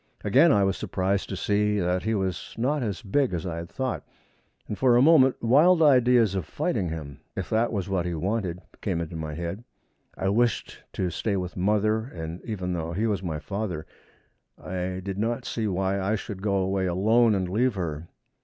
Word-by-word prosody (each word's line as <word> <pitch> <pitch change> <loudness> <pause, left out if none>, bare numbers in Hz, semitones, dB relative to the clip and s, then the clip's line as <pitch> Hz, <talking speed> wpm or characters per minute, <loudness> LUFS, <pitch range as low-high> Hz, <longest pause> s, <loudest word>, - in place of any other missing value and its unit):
Again 135 +11 +5
I 100 -6 +4
was 95 0 +1
surprised, 95 -1 -1
to 95 - -3
see 105 +2 +1
that 90 0 0
he 110 +2 0
was 95 -3 -3
not 140 +5 0
as 105 -2 -3
big 120 +1 +1
as 85 - -4
I 85 -2 -3
had 85 +1 -6
thought, 130 -1 -3 0.7
and 105 - -3
for 125 +2 +4
a - - +5
moment 140 -4 +5
wild 160 +8 +5
ideas 125 -7 +5
of 95 -4 -2
fighting 90 - -1
him, 75 -4 -7 0.2
if - - -5
that 115 +2 +2
was 100 -5 -2
what 95 -3 -1
he 85 - -2
wanted, 90 0 -2 0.2
came 95 -5 -1
into 85 0 -5
my 80 -2 -5
head. 85 +6 -5 0.5
I 95 - 0
wished 115 +4 0
to 90 -2 -1
stay 100 +1 -1
with 90 -1 -4
mother, 105 +3 +2
and 85 -7 -7
even 95 -5 -3
though 85 -1 -3
he 105 +6 0
was 105 -4 0
my 85 -5 -3
father, 90 -2 -4 0.7
I 90 0 -4
did 100 0 -4
not 120 +3 -1
see 110 -2 -2
why 95 0 0
I 100 +3 +1
should 100 -2 -6
go 100 -1 0
away 95 0 0
alone 110 +5 +3
and 95 -2 -1
leave 115 +5 +1
her. 85 -3 -4
100 Hz, 200 wpm, -26 LUFS, 90-115 Hz, 0.7 s, Again